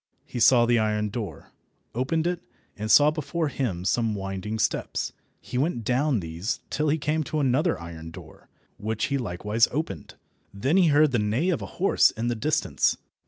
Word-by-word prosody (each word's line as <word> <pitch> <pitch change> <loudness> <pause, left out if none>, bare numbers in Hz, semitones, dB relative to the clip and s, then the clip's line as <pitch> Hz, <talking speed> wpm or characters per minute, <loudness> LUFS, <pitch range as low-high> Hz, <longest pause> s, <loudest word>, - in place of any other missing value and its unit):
He 120 - -6
saw 120 0 +6
the 120 0 +3
iron 105 -1 0
door, 100 -7 -6 0.4
opened 150 +7 0
it, 175 0 -1 0.3
and 110 +1 -5
saw 145 +5 +7
before 155 +1 -2
him 100 -11 -3
some 110 +3 +1
winding 95 +2 -4
steps. - - -1 0.3
He 125 - -4
went 135 -5 0
down 125 0 +1
these 85 +7 -3
till 150 0 0
he 155 - +2
came 155 +1 0
to 155 - -2
another 145 +5 +1
iron 80 -1 -8
door, 80 - -13 0.3
which 110 +1 -2
he 140 - +1
likewise 105 +1 +1
opened. 145 - -4 0.4
Then 130 - 0
he 185 -3 +5
heard 150 0 +4
the 120 - +1
neigh 110 - 0
of 170 - -1
a - - -5
horse 195 - +4
in 115 +1 -3
the 120 - 0
distance. 145 +7 +1
120 Hz, 180 wpm, -26 LUFS, 105-150 Hz, 0.4 s, saw